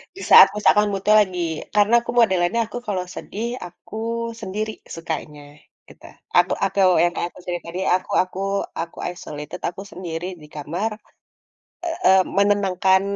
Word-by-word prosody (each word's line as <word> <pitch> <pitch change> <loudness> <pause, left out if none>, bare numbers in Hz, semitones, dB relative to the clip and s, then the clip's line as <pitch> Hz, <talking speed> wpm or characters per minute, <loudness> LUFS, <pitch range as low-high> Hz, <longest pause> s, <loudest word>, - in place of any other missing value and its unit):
Di 390 - -9
saat - - +10
misalkan 210 0 +4
mood-nya 200 +2 +2
lagi 185 -2 -6 0.4
karena 210 +2 +4
aku - - -4
modelannya 190 0 +3
aku 245 - -7
kalau 185 -3 -1
sedih, 220 +3 -5 0.2
aku 180 +4 -13 0.5
sendiri 215 +3 -3 0.2
sukanya. 155 -3 -5 0.5
Gitu, - - -18 0.3
aku - - +4
aku 195 +1 -4 0.3
yang 175 0 +2
kaya - - -1
aku - - -16
cerita 175 -1 -4
tadi 180 - -5 0.2
aku 185 +2 -4
aku 185 0 -9 0.4
aku 165 0 -5
isolated, 150 0 -8
aku 180 - -9
sendiri 170 -2 -5 0.2
di 150 - -13
kamar, 170 +9 -3 1.0
eee, 325 - +4
menenangkan 195 -2 +3
185 Hz, 145 wpm, -22 LUFS, 175-205 Hz, 1.0 s, saat